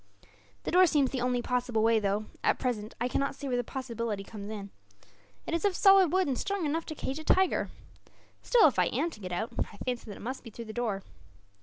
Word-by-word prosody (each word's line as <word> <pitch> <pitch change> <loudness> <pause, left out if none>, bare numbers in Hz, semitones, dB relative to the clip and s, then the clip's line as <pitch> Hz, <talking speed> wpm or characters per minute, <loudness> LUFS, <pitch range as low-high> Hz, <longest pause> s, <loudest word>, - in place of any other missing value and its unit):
"The - - -3
door 365 +1 +7
seems 285 -4 +2
the 260 - -2
only 250 -1 0
possible 245 -3 0
way 225 0 +4
though, 205 +1 0 0.2
at - - +3
present, 220 -4 -3
I 240 - +1
cannot 275 +2 -1
see 280 - -6
where 255 - 0
the 245 - 0
possibility 230 -5 -4
comes 205 0 -8
in. 200 -2 -6 0.7
It - - -4
is 335 - 0
of 400 -3 +2
solid 390 -4 +6
wood, 375 +1 +3
and 265 -3 -1
strong 395 -4 -1
enough 320 +3 -1
to 310 - -5
cage 275 0 -4
a - - -7
tiger. 375 +3 +2 0.7
Still, - - +6
if - - 0
I - - +5
am 340 - -1
to 215 - -12
get 185 -3 -6
out, 220 +7 -2
I 205 - -3
fancy 250 +1 -3
that 205 -3 -8
it - - -12
must 255 +5 -5
be 230 - -9
through 230 +1 -8
the 220 - -8
door." 215 -5 -2
245 Hz, 240 wpm, -30 LUFS, 220-310 Hz, 0.7 s, door